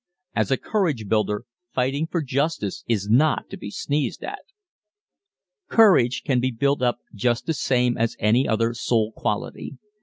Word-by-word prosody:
As - - +1
a 135 - +2
courage 155 - -1
builder 105 +1 0 0.3
fighting 135 +5 0
for 165 -1 -2
justice 140 - -2
is 105 -4 0
not 140 +8 +2
to - - -5
be - - -7
sneezed 145 +7 -2
at. - - -5 1.3
Courage 155 - +4
can 130 -4 +2
be 130 +1 +1
built 140 +3 0
up 120 -1 0
just 120 +3 0
the 165 - 0
same 125 -4 +1
as 115 0 0
any 115 +5 +2
other 115 +1 +1
soul 115 -2 0
quality. 115 +4 -4
125 Hz, 155 wpm, -23 LUFS, 115-140 Hz, 1.3 s, Courage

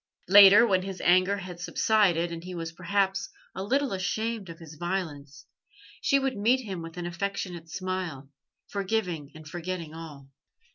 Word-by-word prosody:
Later, 200 +3 +9
when 190 -5 +2
his 190 0 -6
anger 185 +3 +4
had 180 -2 -8
subsided, 175 -1 +2
and 165 0 -6
he 180 0 -7
was 165 -1 -4
perhaps 190 +3 -1 0.2
a 190 - -5
little 265 +5 0
ashamed 215 +2 -2
of 165 - -9
his 160 -2 -11
violence, 155 -5 -5 0.6
she 275 - +3
would 270 -1 -1
meet 235 +6 +2
him 195 -7 -6
with 165 +1 -9
an 175 - -4
affectionate 175 -1 -4
smile, 180 -7 -4 0.4
forgiving 185 -7 -2
and 155 0 -11
forgetting 170 -1 -5
all. 150 -4 -10
185 Hz, 155 wpm, -27 LUFS, 165-200 Hz, 0.6 s, Later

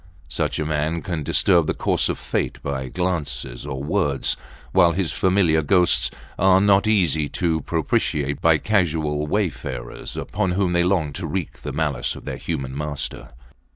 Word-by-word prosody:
Such - - -1
a 75 - -1
man 80 +2 -1
can 85 -5 -3
disturb 85 +2 +3
the - - 0
course - - +1
of - - -1
fate - - -2
by 65 -2 -3
glances 75 -6 -3
or 65 +1 -4
words; 75 -4 +1 0.4
while 85 -1 +5
his 90 -1 0
familiar 90 -4 +3
ghosts 90 +3 +3 0.3
are 95 +1 +5
not 100 +1 +4
easy 80 -9 +2
to 80 -3 0
propitiate 75 -3 -1
by 80 -1 +5
casual 80 -7 0
wayfarers 70 - -3
upon 95 -3 -1
whom 90 -1 +1
they 85 0 +3
long 85 -5 +1
to 90 0 -4
wreak 90 +1 -4
the - - -5
malice 75 -6 -1
of - - -11
their - - -4
human 70 -5 -4
master. 70 -4 -4
80 Hz, 160 wpm, -22 LUFS, 75-90 Hz, 0.4 s, while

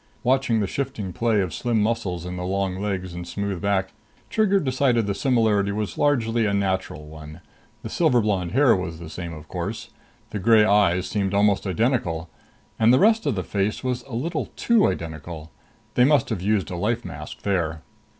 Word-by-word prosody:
Watching 125 -2 +2
the - - +1
shifting 110 -5 -4
play 115 -1 +1
of 90 -4 -3
slim 120 -3 0
muscles 105 -6 -1
in 90 0 -5
the 90 - -4
long 95 0 -1
legs 95 -3 -3
and 85 0 -7
smooth 100 -3 -3
back, 95 -2 0 0.4
Trigger 210 -3 +3
decided 130 - +1
the 100 - -1
similarity 105 -3 +2
was 105 0 -3
largely 115 -6 +1
a 100 - 0
natural 95 -6 -2
one. 75 +1 -11 0.4
The - - -5
silver 155 -8 +3
blonde 100 -5 -1
hair 135 -2 +5
was 90 -3 -4
the 80 -1 -9
same, 85 -2 -6
of 80 -1 -10
course. - - -5 0.4
The 105 - -3
gray 110 +1 +5
eyes 95 -4 +3
seemed 100 0 -1
almost 100 -1 +2
identical 90 -5 0 0.5
and 115 +1 +5
the 130 - +6
rest 220 -1 +3
of 135 - +1
the 95 - -2
face 100 +6 -2
was 125 -1 -1
a 130 - -10
little 155 +6 -2
too 235 -3 +3
identical! 80 0 -5 0.4
They 125 - +4
must 145 +2 +3
have 110 -7 -2
used 100 -1 0
a 90 - -4
life 115 +6 -1
mask 75 -3 -8
there. 85 -5 -1
100 Hz, 190 wpm, -24 LUFS, 90-120 Hz, 0.5 s, the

